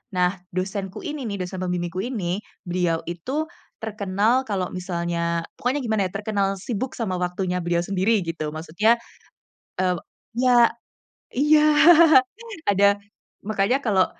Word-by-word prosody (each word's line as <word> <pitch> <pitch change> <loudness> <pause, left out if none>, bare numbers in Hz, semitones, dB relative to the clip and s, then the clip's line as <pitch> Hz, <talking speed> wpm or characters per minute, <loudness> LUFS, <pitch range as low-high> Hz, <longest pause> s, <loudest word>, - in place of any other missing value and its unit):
Nah, 180 +1 +2 0.2
dosenku 190 +1 -3
ini 295 -3 -4
nih, 200 -2 -4
dosen 180 +1 -6
pembimbingku 180 0 -2
ini, 200 -7 -2 0.3
beliau 175 -2 0
itu 260 - -3 0.3
terkenal 215 +3 +1
kalau 190 -4 -1
misalnya, 170 -2 -2
pokoknya 255 +4 0
gimana 220 -3 0
ya, - - -13
terkenal 200 -1 0
sibuk 240 +5 -3
sama 195 -5 -1
waktunya 180 0 -1
beliau 170 0 +1
sendiri 195 +4 +1
gitu 160 -2 -4
maksudnya. 195 +9 +1 0.8
Eee 180 -1 +1 0.4
iya 245 -2 +5 0.7
iya 300 +3 +5 1.1
ada. 200 +1 +4 0.5
Makanya 215 +4 +1
kalau, 190 -4 +3
195 Hz, 125 wpm, -23 LUFS, 180-220 Hz, 1.1 s, iya